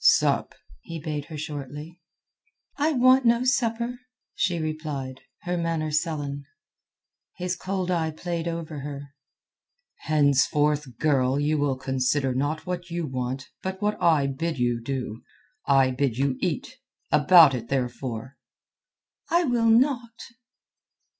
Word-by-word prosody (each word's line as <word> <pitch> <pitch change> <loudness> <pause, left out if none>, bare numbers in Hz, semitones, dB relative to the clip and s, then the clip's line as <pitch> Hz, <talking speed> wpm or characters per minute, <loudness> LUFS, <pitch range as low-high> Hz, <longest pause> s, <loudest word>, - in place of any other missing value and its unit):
"Sup," - - +3 0.2
he 165 -1 -7
bade 150 -1 -4
her 155 -1 -8
shortly. 150 +3 -7 0.8
"I 300 +2 +1
want 255 0 +5
no 235 +1 +3
supper," 240 -1 0 0.3
she 175 -2 0
replied, 155 -5 -4 0.2
her 180 0 -1
manner 165 -2 -1
sullen. 145 -3 -2 0.9
His 180 0 -2
cold 185 0 -2
eye 165 -2 +1
played 170 +1 -4
over 165 -3 -4
her. 140 0 -7 0.9
"Henceforth, 145 -2 +2
girl, 135 -3 +2
you 150 +1 +1
will 145 -2 +1
consider 130 0 0
not 145 +4 -2
what 180 -1 -4
you 170 -1 -2
want, 130 -1 -4
but 190 0 -4
what 210 +1 0
I 160 -5 +4
bid 150 +4 -2
you 120 -1 0
do. 125 -3 -4 0.5
I 135 -2 +4
bid 125 -2 -1
you 135 -1 +1
eat; - - -3 0.3
about 155 -1 +7
it, 120 -2 -4
therefore." 125 -1 -3 0.9
"I 345 +1 +3
will 240 -6 +2
not." 240 0 +3
150 Hz, 125 wpm, -25 LUFS, 135-175 Hz, 0.9 s, about